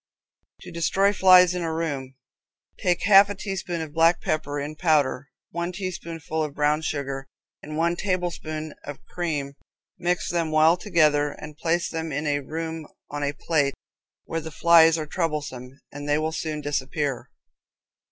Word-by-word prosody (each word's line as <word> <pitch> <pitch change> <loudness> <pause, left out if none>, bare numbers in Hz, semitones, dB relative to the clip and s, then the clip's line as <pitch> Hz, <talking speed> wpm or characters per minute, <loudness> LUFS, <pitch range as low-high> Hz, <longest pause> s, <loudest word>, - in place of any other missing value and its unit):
To - - -10
Destroy 190 +4 +2
Flies 185 -2 +7
in 180 - -3
a 165 -1 -2
room, 140 -5 -3 0.6
take 175 -2 +1
half 200 0 +7
a 205 - -4
teaspoonful 185 -4 -4
of 150 - -14
black 165 +2 +4
pepper 145 -2 -2
in 145 +2 -5
powder, 145 -5 +1 0.2
one 170 +1 -3
teaspoonful 170 -4 -4
of 150 -2 -5
brown 150 +1 +2
sugar, 135 -3 -3 0.3
and 155 +1 -7
one 170 +1 +1
tablespoonful 170 -5 -3
of 145 -1 -9
cream, 150 -6 -3 0.5
mix 175 0 0
them 170 -2 0
well 155 +2 +5
together, 150 -6 +2
and 150 0 -10
place 170 +2 0
them 160 -1 -4
in 145 +2 -2
the 145 -2 0
room 160 +2 -5 0.2
on 145 0 -4
a 145 0 0
plate, 145 -3 0 0.5
where 165 - -3
the 160 - -7
flies 165 0 +5
are 155 - -3
troublesome, 145 -6 -4
and 145 +1 -7
they 145 - +3
will 155 +1 -1
soon 155 -1 -3
disappear. 145 -1 -2
160 Hz, 160 wpm, -25 LUFS, 145-170 Hz, 0.6 s, Flies